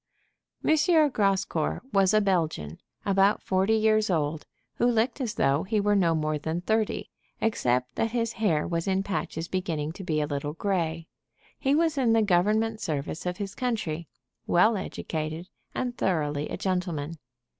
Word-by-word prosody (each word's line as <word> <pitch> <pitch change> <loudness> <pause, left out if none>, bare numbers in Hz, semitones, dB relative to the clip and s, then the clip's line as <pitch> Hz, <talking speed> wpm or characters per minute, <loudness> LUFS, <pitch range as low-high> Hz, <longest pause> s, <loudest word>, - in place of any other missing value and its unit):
M. 315 - +6 0.4
Grascour 195 -7 0
was 195 -1 +4
a 215 0 +4
Belgian, 160 - -1 0.3
about 195 +1 +3
forty 190 +3 +2
years 215 -1 +3
old, 155 -3 -1 0.3
who 240 - +3
looked 240 +3 +1
as 235 -3 -2
though 140 +2 +2
he 210 +3 0
were 205 0 +2
no 170 -4 +3
more 155 -1 -1
than 160 +3 -3
thirty, 220 +3 -1 0.3
except 125 - 0
that 225 - +1
his 230 -1 -1
hair 170 -9 +1
was 170 0 -2
in 190 0 +1
patches 170 -4 -3
beginning 165 -5 -2
to 190 +4 -9
be 155 -3 0
a 150 - +1
little 145 0 -3
gray. 165 -3 -1 0.5
He 275 0 +2
was 320 -2 +2
in 235 -4 +3
the 225 -1 +4
government 215 +4 +2
service 155 +3 -3
of 180 - -2
his 200 -2 -4
country, 195 - -2 0.4
well 215 +6 +4
educated, 160 -2 -4 0.3
and 245 -1 -2
thoroughly 150 -8 -1
a - - -4
gentleman. 170 -5 -2
185 Hz, 160 wpm, -27 LUFS, 160-215 Hz, 0.5 s, M